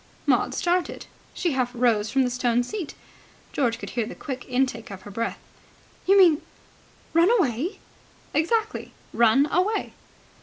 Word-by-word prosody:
Maud - - +2
started. 355 0 0 0.3
She 345 - 0
half 255 -3 0
rose 230 -3 +2
from 270 0 +2
the 250 - 0
stone 245 -1 +1
seat. 355 - -5 0.6
George 240 -5 +1
could - - -7
hear 235 -3 -1
the - - -8
quick 260 -3 -6
intake 250 -3 0
of 190 -2 -9
her 205 - -10
breath. 230 +3 -2 0.7
"You 395 +1 +6
mean 340 -6 +6 0.7
run 335 +3 +5
away?" 340 - +1 0.6
"Exactly. 435 +7 0 0.2
Run 235 +4 +5
away!" 375 +6 0
265 Hz, 145 wpm, -25 LUFS, 235-355 Hz, 0.7 s, You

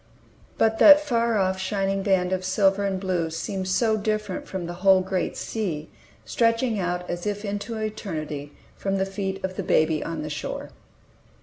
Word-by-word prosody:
But 225 0 +2
that 295 -1 +10
far 235 -6 +1
off, 190 -1 +1
shining 195 0 -1
band 190 -2 +1
of 185 0 -1
silver 195 +1 +2
and 190 -1 -1
blue 180 -4 -1
seemed 185 +4 -4
so 220 +4 +2
different 215 -2 -2
from 185 -2 -4
the 175 - -5
whole 190 -1 +6
great 185 -1 -2
sea, 170 -9 -4 0.3
stretching 230 -1 +1
out 180 -1 -2
as 175 +3 -4
if 205 +1 -3
into 205 +3 -4
eternity 155 -9 -4 0.2
from 195 0 -2
the 190 - +1
feet 195 0 -4
of 185 0 -6
the - - -2
baby 155 0 +2
on 165 -2 -4
the 155 - -5
shore! 150 - -5
195 Hz, 175 wpm, -25 LUFS, 180-215 Hz, 0.3 s, that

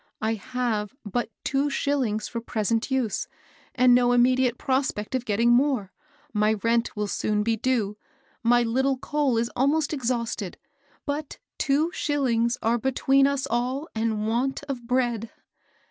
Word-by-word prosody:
I 220 +1 0
have 225 0 -2
but 235 +5 -2
two 280 +1 +1
shillings 260 -7 0
for 230 - -5
present 225 +1 -1
use 255 -6 -1 0.5
and 250 -1 +5
no 245 0 +4
immediate 250 0 +3
prospect 260 -5 -1
of 255 -2 -1
getting 230 +2 +2
more; 245 -6 +2 0.4
my 210 0 +3
rent 230 +2 0
will 210 - 0
soon 210 +1 0
be 225 +1 +1
due; 220 -3 0 0.4
my 240 +1 +4
little 265 +3 +1
coal 280 -2 0
is 230 +1 0
almost 290 +4 +1
exhausted; 235 - -2 0.5
but 295 0 -4 0.2
two 305 +3 +2
shillings 245 -7 +1
are 235 +2 +2
between 270 +2 +3
us 280 -1 -1
all 255 +5 -1
and 220 -1 -1
want 255 +5 -1
of 260 -5 -6
bread 240 -3 0
245 Hz, 145 wpm, -25 LUFS, 225-270 Hz, 0.5 s, and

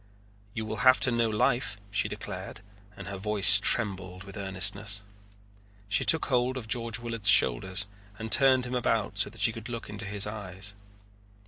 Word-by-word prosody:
"You 110 - -4
will 110 0 -5
have 130 0 +5
to 130 - +2
know 115 -1 0
life," 115 0 0
she 100 - 0
declared, - - -8 0.4
and - - -9
her 100 0 -6
voice 105 0 +4
trembled 95 -4 +1
with 100 -1 -12
earnestness. 100 +1 -2 0.9
She 100 - +2
took 160 - +5
hold 125 0 0
of 115 -4 -8
George 115 0 -1
Willard's 115 -4 -3
shoulders 95 - +4 0.3
and 110 0 -7
turned 130 -2 +4
him 125 - -6
about 115 -5 -1
so 100 - +2
that - - -11
she 115 - +3
could 115 +1 -10
look 115 -3 -7
into 105 0 -5
his 100 0 0
eyes. 100 -1 -6
105 Hz, 175 wpm, -27 LUFS, 100-120 Hz, 0.9 s, have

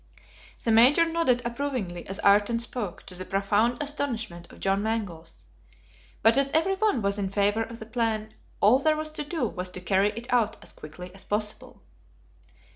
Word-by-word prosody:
The 230 - +1
Major 255 +9 +6
nodded 325 -7 +1
approvingly 235 -9 -3
as 195 - -6
Ayrton 205 +3 +4
spoke, 230 -5 -5
to - - -8
the 180 +1 -5
profound 205 +5 +1
astonishment 235 -12 -4
of - - -15
John 195 +1 +1
Mangles; 175 - -4 0.8
but 225 +2 +6
as 275 0 +1
every 330 +5 +3
one 385 - +1
was 200 +1 0
in 195 -1 -1
favor 205 +2 +1
of 230 +1 -5
the 220 - -9
plan 220 -1 -2 0.3
all 230 +6 +6
there 310 +2 +2
was 310 0 -4
to 305 - -4
do 300 -4 -2
was 180 -2 -4
to 180 - -7
carry 195 +2 +2
it 230 +1 -6
out 225 -3 +2
as - - -11
quickly 180 +4 -10
as 195 - -9
possible. 210 0 -4
220 Hz, 180 wpm, -27 LUFS, 195-250 Hz, 0.8 s, Major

